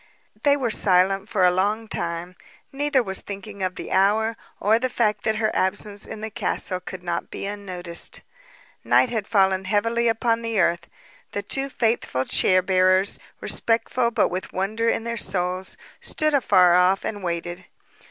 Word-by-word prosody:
They 285 -1 +3
were 245 -5 -1
silent 195 0 +2
for 190 -4 +2
a 180 - +5
long 210 +4 0
time. 170 -3 -3 0.4
Neither 280 -1 +1
was 190 -3 -3
thinking 200 0 -8
of 185 -1 -1
the - - -7
hour, 220 +4 +2 0.2
or 220 +3 +3
the 255 +1 -1
fact 210 -4 0
that 220 - +1
her 215 0 -1
absence 200 +2 -1
in 215 - -8
the 220 0 -5
castle 185 -2 -2
could 185 0 -9
not 170 -1 -3
be - - -6
unnoticed. 185 -4 -1 0.6
Night 255 - +3
had 220 -4 -3
fallen 190 -3 +2
heavily 230 +4 +1
upon 230 0 +1
the 230 -2 -2
earth. 170 -1 +1 0.5
The 205 - -3
two 270 +6 -1
faithful 225 - -1
chair 185 -1 +3
bearers, 185 +1 +3 0.2
respectful 235 +1 +1
but 235 - +1
with 185 +1 -5
wonder 215 +5 -1
in 225 - -1
their 235 0 -4
souls, 185 -1 -2 0.2
stood 310 -1 -1
afar 185 -10 +4
off 180 +2 +3
and 205 -2 -4
waited. 175 +1 -4
200 Hz, 165 wpm, -23 LUFS, 185-225 Hz, 0.6 s, a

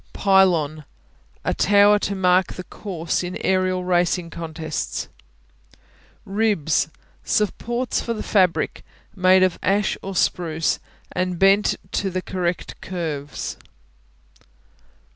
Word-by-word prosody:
Pylon 175 -6 +3 0.6
A - - +1
tower 205 +1 +5
to 200 - -2
mark 185 0 +3
the 185 - -7
course 175 -4 -3
in 180 0 -4
aerial 185 -1 +1
racing 175 -1 +1
contests. 160 - -4 1.2
Ribs 200 -8 +1 0.4
Supports 235 +4 -1
for 230 - -3
the 215 - -5
fabric, 185 -5 +1 0.3
made 185 0 +5
of 185 -2 +1
ash 200 +1 +1
or 195 0 -6
spruce 165 -3 0 0.3
and 185 -1 -1
bent 195 +3 +4 0.2
to 195 - -1
the 185 0 -3
correct 180 -1 -3
curves. 155 -6 -4
185 Hz, 105 wpm, -22 LUFS, 170-195 Hz, 1.2 s, tower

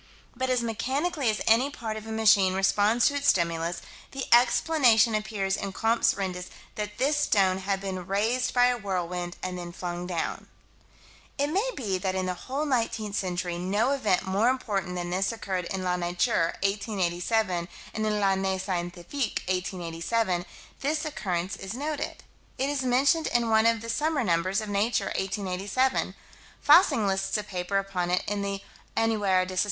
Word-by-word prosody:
But 260 +1 -2
as 250 -2 +1
mechanically 265 +5 -1
as 215 - -1
any 235 +5 +4
part 230 -7 -5
of 220 0 -7
a - - -5
machine 205 -4 +4
responds 205 +4 +3
to - - +4
its 285 0 -1
stimulus, 170 -1 +1 0.3
the 270 -1 -3
explanation 240 -2 +5
appears 210 -3 -1
in 195 -1 -4
Comptes 225 +3 +2
Rendus 180 -2 -4 0.2
that 210 0 -5
this 290 +3 +2
stone 195 -9 +2
had 195 0 -1
been 190 -2 -5
raised 220 +6 +1
by 245 -1 +4
a 245 -1 +1
whirlwind 180 -3 -3
and 180 -1 -3
then 175 0 -6
flung 175 0 -5
down. 175 -3 -3 0.9
It 285 +1 0
may 405 +8 +1
be 195 -7 -2
that 185 0 -1
in 185 0 -1
the 185 - -1
whole 265 +11 -4
nineteenth 230 -6 -1
century 180 -2 -2
no 200 +8 +1
event 220 -10 +1
more 200 +5 +2
important 200 -8 -2
than 175 0 -3
this 190 +4 +1
occurred. 190 -5 -3
In 190 +1 -4
La 180 -1 0
Nature, 175 0 0
1887, 195 -2 0 0.3
and 215 - -2
in 215 - +1
L'Année 190 -1 +1
Scientifique, 185 +6 -3
1887, 180 +1 -1 0.3
this 305 +3 -1
occurrence 190 - -2
is 195 +3 -6
noted. 295 +3 -4 0.3
It 270 +2 0
is 285 -2 -1
mentioned 270 +6 +3
in 235 -1 +1
one 220 +1 +5
of 230 -1 +2
the 230 - -7
summer 295 +4 0
numbers 185 +2 +1
of 215 - -6
Nature, 205 +4 0
1887. 200 +6 -1 0.4
Fassig 290 - +5
lists 195 +1 0
a 210 - -3
paper 185 0 -2
upon 195 -3 -1
it 180 +1 +1
in 205 0 -1
the 200 0 -3 0.3
_Annuaire 205 -5 +2
de 185 0 -6
Soc. - - +3
200 Hz, 170 wpm, -27 LUFS, 185-235 Hz, 0.9 s, explanation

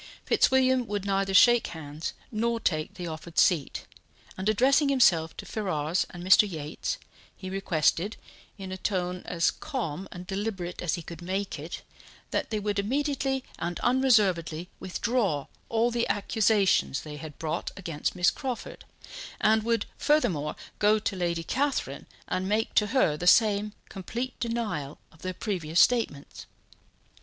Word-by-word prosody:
Fitzwilliam 260 -2 +3
would 205 -1 -3
neither 195 0 0
shake 240 +4 +6
hands 155 0 -6 0.2
nor 230 +1 0
take 155 -7 -1
the 180 - -6
offered 160 0 -8
seat, 165 -7 +2 0.5
and 190 +3 -1
addressing 270 +7 +4
himself 170 - +3
to - - -7
Ferrars 175 -5 -1
and 175 -1 -9
Mr. 190 +3 +6
Yates, 155 -2 -4 0.4
he 185 -1 -7
requested, 190 +1 +1 0.4
in 190 -2 -7
a 185 - -4
tone 180 -2 -2
as 170 -1 +1
calm 195 - -4
and 180 0 -8
deliberate 190 -2 -4
as 175 - 0
he 170 - -7
could 170 +2 -9
make 190 +3 -3
it, - - -7 0.5
that - - -1
they 215 - -1
would 205 -1 -1
immediately 270 +3 0 0.2
and 170 +1 -3
unreservedly 200 -10 +2
withdraw 190 - -1 0.2
all 230 +1 +2
the 235 0 0
accusations 200 - +2
they 150 -1 -8
had 155 -1 -9
brought 160 +1 -3
against 165 -5 -3
Miss 180 0 +4
Crawford, 260 -4 -6 0.5
and 220 +1 +4
would 230 -1 0
furthermore 200 - +1 0.2
go 210 +1 +4
to 210 -1 -2
Lady 170 -2 -1
Catherine 280 - -1 0.2
and 185 +1 -2
make 215 +2 0
to 210 - +3
her 205 - +2
the 175 - -3
same 210 0 +4
complete 235 +6 -5
denial 230 - -3
of 160 - -21
their 185 0 -4
previous 175 -6 -1
statements. 225 -13 +1
195 Hz, 150 wpm, -28 LUFS, 170-230 Hz, 0.5 s, shake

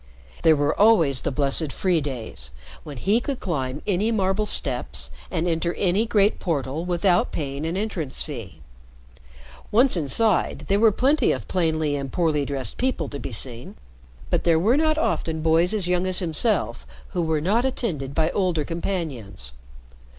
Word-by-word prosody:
There 160 - +5
were 145 0 +1
always 165 - +5
the - - -1
blessed 140 +2 +2
"free 180 -1 +1
days," 115 - -5 0.3
when 145 -3 -8
he 205 - +2
could 275 0 -3
climb 135 -5 -3
any 205 +2 +1
marble 205 -1 0
steps, 125 - -1 0.2
and 165 +2 -1
enter 170 0 -1
any 200 +4 +1
great 210 -2 +2
portal 150 -1 -2
without 175 0 +2
paying 145 +1 -3
an 170 +3 -2
entrance 185 -10 -2
fee. 115 - -8 1.1
Once 245 +3 +4
inside, 180 +6 +1
there 200 +1 +3
were 225 0 +6
plenty 275 +8 +2
of 130 -5 -3
plainly 160 -4 0
and 135 -2 -4
poorly 155 -5 +1
dressed 135 -5 -2
people 245 - -1
to 140 - -6
be - - -6
seen, 120 +2 -2 0.6
but - - +1
there 165 -2 +4
were 210 +10 +3
not 310 +1 +2
often 160 - -1
boys 165 +2 +3
as 205 -5 0
young 180 +1 +1
as 185 -1 0
himself 165 - 0 0.2
who 180 - -2
were 160 -2 0
not 205 +10 +1
attended 165 - -2
by 160 0 +2
older 180 -6 0
companions. 140 - -4
165 Hz, 165 wpm, -24 LUFS, 140-195 Hz, 1.1 s, were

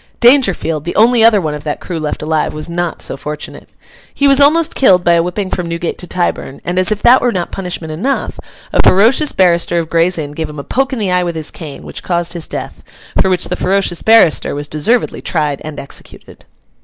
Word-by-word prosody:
Dangerfield, 215 - +3
the 170 - -4
only 230 +1 +4
other 225 -2 +6
one 155 -5 -2
of 150 -1 -7
that 150 -1 -3
crew 170 -3 -5
left 150 -1 -4
alive, 155 0 -1
was 155 - -3
not 175 0 -3
so - - -5
fortunate. 150 +2 -8 0.4
He 280 - +1
was 275 0 +4
almost 310 +3 +3
killed 185 -9 +4
by 170 - +4
a 170 - +4
whipping 185 +3 -3
from 180 -2 -2
Newgate 170 0 -4
to 180 - -5
Tyburn, 175 -6 -2
and, 175 +1 -1
as 185 +3 +2
if 210 - -2
that 245 +2 +6
were 245 - +1
not 180 -5 -3
punishment 175 -4 -5
enough, 250 - -2 0.3
a - - +1
ferocious 235 +10 +4
barrister 175 -2 +2
of 165 -1 -2
Gray's 170 +2 +2
Inn 145 -2 -4
gave 155 +1 -5
him 150 - -10
a 140 - -5
poke 270 - -1
in 260 - -3
the 200 -4 -1
eye 180 0 +2
with 170 -1 -3
his 160 -2 -3
cane, 155 -5 -9
which - - -8
caused 175 -1 -1
his 170 -3 -4
death; - - -7 0.4
for 190 - +1
which 180 -2 0
the 180 - -1
ferocious 185 -2 -1
barrister 220 -11 +4
was 145 0 -5
deservedly 185 +12 -1
tried 150 -5 -2
and 155 -1 -7
executed. 140 - -8
175 Hz, 225 wpm, -14 LUFS, 155-210 Hz, 0.4 s, other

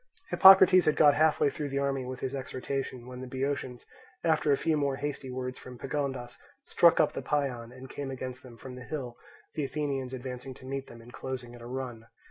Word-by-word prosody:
Hippocrates 190 -2 +8
had 155 - +3
got 145 -2 +6
half 155 +1 +3
through 145 0 0
the 140 - -3
army 135 -2 0
with 130 0 -6
his 130 0 -3
exhortation, 130 -1 -4
when 125 0 -8
the 130 - -6
Boeotians, 130 -1 -3 0.4
after 160 -2 +2
a 140 - +4
few 160 - +1
more 140 -2 0
hasty 140 -1 -4
words 125 0 -5
from 125 -1 -10
Pagondas, 135 -3 -4 0.3
struck - - +5
up - - +3
the - - -4
paean, 125 -5 -2
and 130 +1 -11
came 140 +1 -6
against 130 -1 -6
them 125 -3 -13
from 130 +2 -9
the 125 0 -9
hill; 130 -4 -5 0.4
the 150 - -2
Athenians 135 -2 -2
advancing 130 0 -6
to 130 - -14
meet 135 0 -4
them, 115 - -12
and 120 - -14
closing 125 -2 -6
at 120 - -12
a 120 - -9
run. 120 -3 -6
130 Hz, 210 wpm, -29 LUFS, 125-140 Hz, 0.4 s, Hippocrates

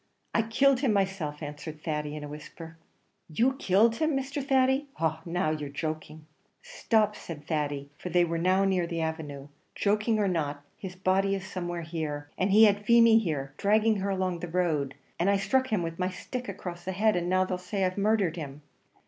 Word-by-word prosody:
"I - - +3
killed 255 +4 +3
him 250 -7 +2
by 200 - +5
myself," 165 -6 -4
answered 150 +1 -7
Thady, 150 -2 -2
in 150 - -6
a - - -5
whisper. 160 +2 -10 0.5
"You 235 +12 +2
killed 225 0 +3
him, 315 -3 +1
Mr. 275 +1 -3
Thady 265 +1 +2
ah! 160 -1 0
now, 170 -2 0
you're 150 -2 -3
joking." 155 +1 -5 0.4
"Stop!" 225 - +1
said 150 -3 -9
Thady 145 -3 -2
for 180 - -5
they 175 0 +4
were 165 0 -2
now 185 +3 +3
in 195 - +2 0.2
the 170 -1 -3
avenue 150 -3 -4 0.3
"joking 210 +2 +1
or 205 -2 +2
not, 145 -5 -2
his 185 -2 -8
body 190 +1 +1
is 190 -1 -5
somewhere 175 -2 -4
here; 150 -3 -4
and 190 - 0
he 210 +3 +7
had 205 -1 +4
Feemy 230 0 +6
here, 145 -9 -3
dragging 215 +1 +3
her 200 +1 -2
along 185 -2 -1
the 175 - -5
road, 160 -6 0 0.2
and 175 +3 +2
I 200 - +4
struck 260 +7 +1
him 210 -7 0
with 165 +1 -5
my 180 0 +1
stick 245 +6 -6
across 180 -3 -6
the 190 0 -3
head, 215 +3 +2
and 175 0 -1
now 185 0 +3
they'll 185 -1 -3
say 190 +1 -1
I've 185 0 -1
murdhered 200 -4 +1
him." 145 -2 -7
180 Hz, 200 wpm, -28 LUFS, 160-210 Hz, 0.5 s, he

